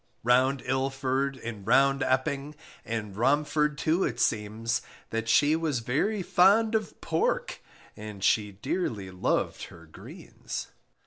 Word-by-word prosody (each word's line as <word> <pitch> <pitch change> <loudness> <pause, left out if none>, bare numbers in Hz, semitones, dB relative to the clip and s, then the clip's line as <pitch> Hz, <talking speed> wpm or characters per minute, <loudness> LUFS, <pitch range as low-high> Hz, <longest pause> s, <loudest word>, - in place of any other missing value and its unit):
Round 130 +3 +3
Ilford 135 +1 -1
and 110 -4 -7
round 135 +3 +4
Epping, 135 +3 -1 0.3
And 110 -4 -4
Romford 150 +5 +1
too 160 +5 +1
it 120 -2 -2
seems, 115 +3 0 0.3
That 115 0 -2
she 145 +7 +4
was 155 -7 -1
very 185 - 0
fond 205 +6 +4
of 220 -1 -2
pork, - - -1 0.3
And 105 -2 -8
she 105 0 +2
dearly 105 - -3
loved 90 - -1
her 85 - -14
greens! 80 - -8
130 Hz, 125 wpm, -28 LUFS, 115-150 Hz, 0.3 s, round